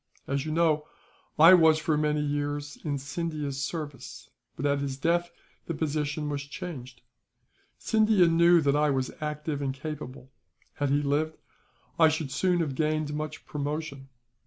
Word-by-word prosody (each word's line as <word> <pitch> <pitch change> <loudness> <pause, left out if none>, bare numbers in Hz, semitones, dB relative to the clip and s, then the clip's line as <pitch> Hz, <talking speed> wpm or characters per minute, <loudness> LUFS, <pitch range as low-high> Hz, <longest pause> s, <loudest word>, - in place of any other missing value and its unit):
As 140 +2 -2
you - - -2
know, 155 -2 +2 0.5
I 165 +4 +9
was 160 -3 +6
for 155 0 0
many 150 0 +1
years 145 0 -2
in 145 -3 -1
Scindia's 145 -1 -4
service; 150 -3 -6 0.2
but 140 - -4
at 140 0 +2
his 140 -1 -3
death 170 +4 +1 0.4
the 165 - -3
position 150 0 -2
was 145 -1 -2
changed. 140 -4 -8 0.8
Scindia 215 -5 +3
knew 170 +1 +5
that 140 -1 +2
I 150 0 +3
was 130 -2 -1
active 150 -1 -3
and 135 -1 -2
capable; 135 -3 -7 0.4
had 145 -1 -1
he 145 +1 +2
lived, 150 +3 0 0.6
I 160 -1 +7
should 155 -3 -3
soon 175 +5 +1
have 150 -4 -2
gained 155 0 -1
much 150 0 -5
promotion. 145 -2 -4
150 Hz, 155 wpm, -28 LUFS, 140-160 Hz, 0.8 s, I